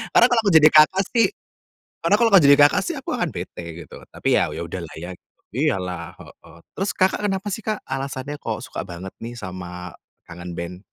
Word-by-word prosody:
Karena - - +8
kalau 235 - +4
aku 205 -3 +1
jadi 155 -1 +8
Kakak 155 +5 +6
sih 230 -4 +4 0.7
karena 180 +5 +3
kalau 230 -2 +2
enggak 175 -7 +7
jadi 140 - +8
Kakak 145 0 +5
sih 345 - -3
aku 265 - -5
akan 200 -9 -1
bete 90 -5 -7 0.2
gitu, - - -13
tapi - - -1
ya - - +3
ya - - -5
udahlah - - -6
ya, 90 +3 -7 0.4
iya 140 -1 +1
lah, 90 -2 -6
heeh. - - -16 0.2
Terus 195 +2 -2
Kakak 190 +2 +2
kenapa 195 +1 -3
sih 225 - -5
Kak 215 0 -2
alasannya 135 +2 -5
kok 110 -2 -3
suka - - -6
banget 95 +1 -8
nih 120 +1 -7
sama 90 -3 -7 0.3
Kangen 85 0 -9
Band? 90 +2 -6
140 Hz, 205 wpm, -22 LUFS, -, 0.7 s, Karena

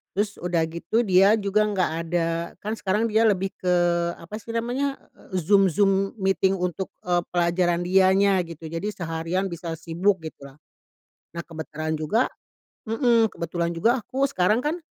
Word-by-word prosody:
Terus, 205 0 -1
udah 175 -1 0
gitu 170 +8 -1
dia 195 -1 +5
juga 210 0 +1
nggak 195 -5 0
ada 165 0 0 0.3
kan 215 +2 -3
sekarang 210 +4 0
dia 220 +1 +3
lebih 195 -3 +2
ke, 180 -1 0 0.5
apa 205 +6 -7
sih 230 +1 -8
namanya, 250 +4 -1 0.4
Zoom 195 +2 +4
Zoom 195 -1 +2
meeting 190 0 +2
untuk, 180 0 -3
eee, 175 -1 +1
pelajaran 175 0 +1
dianya 190 +2 +4
gitu, 165 -1 -9
jadi 165 +5 -4
seharian 170 +2 -2
bisa 170 -1 -5
sibuk, 180 +3 0
gitu 155 -3 -9
lah. - - -24 0.8
Nah, 170 - -2
kebetulan 155 -1 -4
juga 205 +11 +1 0.6
heeh, 230 0 +3
kebetulan 170 0 -3
juga 230 +10 +2
aku 260 +4 -4
sekarang 210 +3 +2
kan, 310 +4 -1
190 Hz, 155 wpm, -24 LUFS, 170-210 Hz, 0.8 s, dia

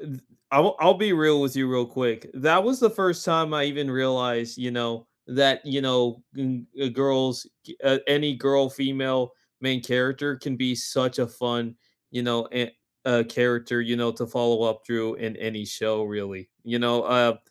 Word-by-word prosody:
th 135 -3 -10 0.3
I 135 - +2
w 145 - +5
I'll 185 +4 +7
be 205 0 +1
real 155 -3 +4
with 135 -2 -1
you 135 -1 0
real 125 -1 0
quick. 120 -2 -2
That 160 +8 +4
was 255 +2 +1
the 225 - +6
first 185 -4 0
time 160 -2 +2
I 145 -2 +2
even 145 -1 -2
realized, 125 -3 -1
you 125 0 -4
know, 115 -1 -3 0.2
that, 135 +1 +4
you 140 0 -1
know, 125 -2 +1 0.2
n 130 -3 -4
eh, 135 -2 0
girls 130 0 0 0.2
gi - - -15
uh, 135 0 +4
any 145 0 +3
girl 135 +2 +2
female 135 -2 -1 0.3
main 130 -1 0
character 130 +3 0
can 130 -1 -5
be 125 0 0
such 125 +1 -1
a 125 - +1
fun, 120 -1 -3 0.3
you 125 - -4
know, 115 -1 0
and 120 -1 -2 0.3
a 120 -3 +3
character, 120 0 0
you 120 +1 -1
know, 120 -1 0
to 120 - -5
follow 120 -1 +1
up 110 0 -1
through 115 -1 -2
in 110 -1 -6
any 110 -1 -5
show 110 +1 -2
really. 100 -3 -7 0.2
You 120 +1 -2
know, 120 0 +2
uh, 120 -2 +3
125 Hz, 190 wpm, -25 LUFS, 120-135 Hz, 0.3 s, I'll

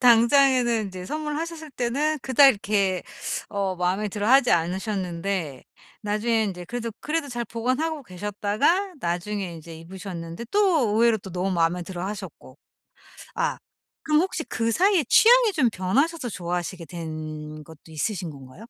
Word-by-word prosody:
당장에는 240 -1 +5
인제 185 -1 -8
선물하셨을 310 +1 -4
때는 285 +6 0
그닥 270 +2 +6
이렇게 200 -5 +1 0.5
어 195 -2 -2
마음에 185 +4 0
들어 205 +2 -2
하지 265 -1 +6
않으셨는데 180 - -2 0.4
나중에 220 +2 +1
인제 180 -3 -5
그래도 235 +1 -4
그래도 300 -1 -2
잘 240 -1 -3
보관하고 255 +8 -2
계셨다가 210 - 0
나중에 180 +2 -2
인제 165 0 -10
입으셨는데 175 +2 -7
또 365 - +3
의외로 230 0 +4
또 190 -1 -10
너무 185 +2 -1
마음에 175 0 +1
들어 175 0 -6
하셨고. 195 -3 -8 0.8
아 - - 0 0.5
그럼 305 0 +3
혹시 365 -3 -2
그 230 0 -1
사이에 370 - +3
취향이 475 -1 +6
좀 265 -8 +3
변하셔서 250 - 0
좋아하시게 175 -1 -4
된 155 -2 -7
것도 160 0 -15
있으신 170 +3 -3
건가요? 135 +4 -13
210 Hz, 345 characters per minute, -25 LUFS, 180-270 Hz, 0.8 s, 그닥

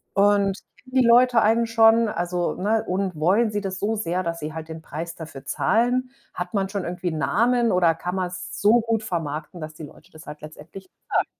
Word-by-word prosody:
Und 200 -1 +3 0.3
kennen 255 0 -13
die - - +3
Leute 240 0 +5
einen 225 +2 +3
schon, 225 0 +5
also, 175 0 -2
ne, 215 +4 0
und 185 -1 -2
wollen 200 +9 +2
sie 205 - -2
das 190 -1 -4
so 220 +2 0
sehr, 185 -3 -2
dass 170 0 -3
sie 155 +1 -5
halt 160 0 -7
den 160 0 -7
Preis 165 +2 -6
dafür 145 -4 -10
zahlen? 245 - +1 0.2
Hat 180 +2 -5
man 195 -1 +1
schon 200 -2 -3
irgendwie 175 0 -3
'n 160 - -4
Namen 235 +5 +2
oder 175 -2 +3
kann 180 +2 -4
man's 180 -1 -4
so 225 +3 +5
gut 225 -1 -1
vermarkten, 160 -1 -4
dass 155 0 -7
die 160 - -10
Leute 155 +4 -14
das 155 0 -14
halt 150 0 -9
letztendlich 155 +5 -11
bezahlen. - - -2
185 Hz, 210 wpm, -23 LUFS, 165-225 Hz, 0.3 s, Leute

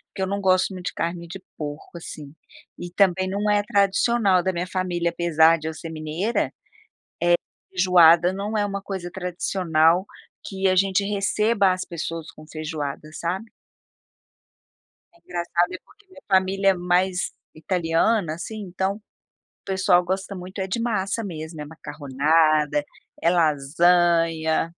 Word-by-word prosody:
Que 190 - -1
não 200 +1 -2
gosto 185 0 +2
muito 180 -1 -6
de - - -3
carne 170 0 -3
de 180 +3 -8 0.2
porco, 150 +2 -7
assim, 150 -3 -9 0.4
e 175 - -7
também 185 0 +2
não 205 +2 -1
é 205 0 +3
tradicional 200 -1 +2
da 190 +1 0
minha 175 +1 -3
família, 180 -2 -1
apesar 165 -1 +4
de 155 - -6
eu 160 - -3
ser 165 +1 -8
mineira, 160 +8 -2
eh, - - -10 1.2
feijoada 180 -1 +5
não 205 +3 -3
é 205 - +1
uma 200 -1 -4
coisa 190 -3 -6
tradicional, 175 -1 +1 0.4
que 195 -1 -1
a 185 - +3
gente 195 +1 +2
receba 205 0 +2
as 185 0 -2
pessoas 165 -1 -5
com 155 - -15
feijoada, 155 -2 -5
sabe. 185 +8 -4 1.6
Engraçado, 175 - -2
é 185 - -4
porque 415 0 -24
minha 370 -7 -16
família 195 +1 +3
é - - +5
mais 180 +1 0 0.2
italiana, 165 +3 0
assim, 195 +7 -7
então, 190 +1 -2
o 210 - -20 0.5
pessoal 190 -2 +3
gosta 190 +2 -3
muito 185 +1 -8
é 190 - -1
de 195 +5 -2
massa 220 -2 -1
mesmo. 160 -4 -7
É - - -5
macarronada, 150 0 +1 0.4
é 170 - +4
lasanha 165 +1 +2
180 Hz, 145 wpm, -23 LUFS, 165-195 Hz, 1.6 s, feijoada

